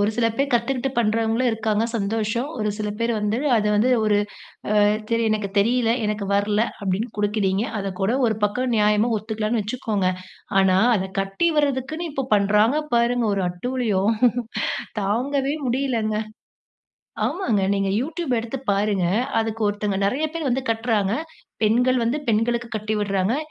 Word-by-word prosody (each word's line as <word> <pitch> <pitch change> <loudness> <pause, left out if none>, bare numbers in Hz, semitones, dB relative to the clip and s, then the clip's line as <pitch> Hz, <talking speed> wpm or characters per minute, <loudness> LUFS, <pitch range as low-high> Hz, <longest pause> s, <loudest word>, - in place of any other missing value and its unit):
ஒரு 205 +1 +2
சில 235 -1 +3
பேர் 275 +1 0
கத்துக்கிட்டு 255 +2 0
பண்றவங்களும் 225 +2 +1
இருக்காங்க, 220 -1 0
சந்தோஷம். 220 +4 -1
ஒரு 210 -1 0
சில 210 - -2
பேர் 230 0 0
வந்து 210 +2 0 0.2
அத 210 - +1
வந்து 240 +5 +3
ஒரு 210 -1 +3 0.5
அ - - +2 0.4
சரி 230 0 +2
எனக்கு 215 -2 -1
தெரியல, 230 +2 +3
எனக்கு 210 -1 -2
வர்ல 205 +2 +2 0.2
அப்டின்னு 200 +4 -1
குடுக்குறீங்க 205 -1 +1 0.2
அதக்கூட 195 +2 -1
ஒரு 220 -2 0
பக்கம் 240 +4 0
நியாயமா 210 +2 +3
ஒத்துக்கலான்னு 215 +1 -2
வச்சுக்கோங்க. 210 -3 -2 0.5
ஆனா 190 -1 +4 0.2
அத 190 - -1 0.2
கட்டி 195 +12 0
வர்றதுக்குன்னு 290 +4 -1
இப்போ 270 -2 -2
பண்றாங்க 210 +6 +3 0.2
பாருங்க, 235 0 +2
ஒரு 195 - -1
அட்டூழியம். 215 +1 0 0.9
தாங்கவே 270 +7 0
முடியலங்க. 240 -4 0 1.1
ஆமாங்க, 235 - 0
நீங்க 195 -1 0
YouTube 310 +1 -3
எடுத்து 230 +4 -5
பாருங்க. 200 -2 +1 0.3
அதுக்கு 225 0 -3
ஒருத்தங்க 205 -1 -1
நெறைய 255 +10 +1
பேர் 330 -2 -3
வந்து 260 +1 0
கட்றாங்க. 225 -3 +1 0.5
பெண்கள் 245 +4 +3
வந்து 235 +5 0
பெண்களுக்கு 235 +2 +1
கட்டி 215 0 -2
விட்றாங்க. 200 +2 0
220 Hz, 140 wpm, -23 LUFS, 205-245 Hz, 1.1 s, ஆனா